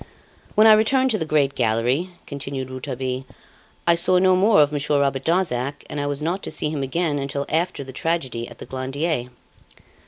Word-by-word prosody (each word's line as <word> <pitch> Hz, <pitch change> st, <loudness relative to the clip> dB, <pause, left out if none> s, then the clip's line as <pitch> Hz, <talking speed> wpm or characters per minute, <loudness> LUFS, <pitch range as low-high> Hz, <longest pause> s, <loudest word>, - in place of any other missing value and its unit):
"When 215 Hz, 0 st, +6 dB
I 220 Hz, -, +9 dB
returned 260 Hz, +5 st, +3 dB
to 215 Hz, -, 0 dB
the 160 Hz, -, -3 dB
great 145 Hz, -3 st, +2 dB
gallery," 120 Hz, +9 st, 0 dB, 0.2 s
continued 135 Hz, -2 st, -5 dB
Rouletabille, 130 Hz, 0 st, -4 dB, 0.6 s
"I 170 Hz, -, +5 dB
saw 180 Hz, +2 st, +3 dB
no 185 Hz, 0 st, +4 dB
more 200 Hz, 0 st, +4 dB
of 145 Hz, -, -1 dB
Monsieur 145 Hz, 0 st, 0 dB
Robert 135 Hz, -1 st, 0 dB
Darzac, 145 Hz, -6 st, 0 dB
and 150 Hz, -, -3 dB
I 145 Hz, -, -2 dB
was 145 Hz, +1 st, -3 dB
not 175 Hz, +5 st, -1 dB
to -, -, -5 dB
see 155 Hz, -1 st, -1 dB
him 150 Hz, -3 st, -3 dB
again 145 Hz, +2 st, -1 dB
until 140 Hz, +1 st, -3 dB
after 165 Hz, -2 st, -1 dB
the 130 Hz, 0 st, -10 dB
tragedy 130 Hz, -7 st, -2 dB
at 120 Hz, -, -13 dB
the -, -, -9 dB
Glandier. 135 Hz, +1 st, -2 dB
145 Hz, 190 wpm, -22 LUFS, 130-170 Hz, 0.6 s, I